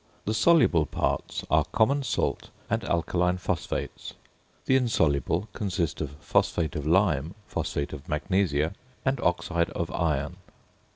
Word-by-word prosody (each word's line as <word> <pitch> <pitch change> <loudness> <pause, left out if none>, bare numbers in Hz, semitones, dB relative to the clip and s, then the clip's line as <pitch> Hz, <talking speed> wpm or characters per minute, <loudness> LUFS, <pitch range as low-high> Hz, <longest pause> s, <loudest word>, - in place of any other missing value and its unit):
The 110 - 0
soluble 110 - +4
parts - - -2
are, - - +5
common 140 +6 +2
salt 115 -5 -1 0.2
and - - +1
alkaline 90 +1 +1
phosphates; - - -3 0.5
the 130 - +3
insoluble 85 - +1
consist 95 -7 -2
of 75 -1 -4
phosphate 80 -2 +1
of 75 0 -3
lime, 85 -2 +2
phosphate 70 +1 -3
of 70 -1 -9
magnesia, 80 -1 +1 0.3
and 135 -1 +1
oxide 85 -2 +1
of 85 - -3
iron. 75 -5 -1
85 Hz, 125 wpm, -27 LUFS, 75-105 Hz, 0.5 s, are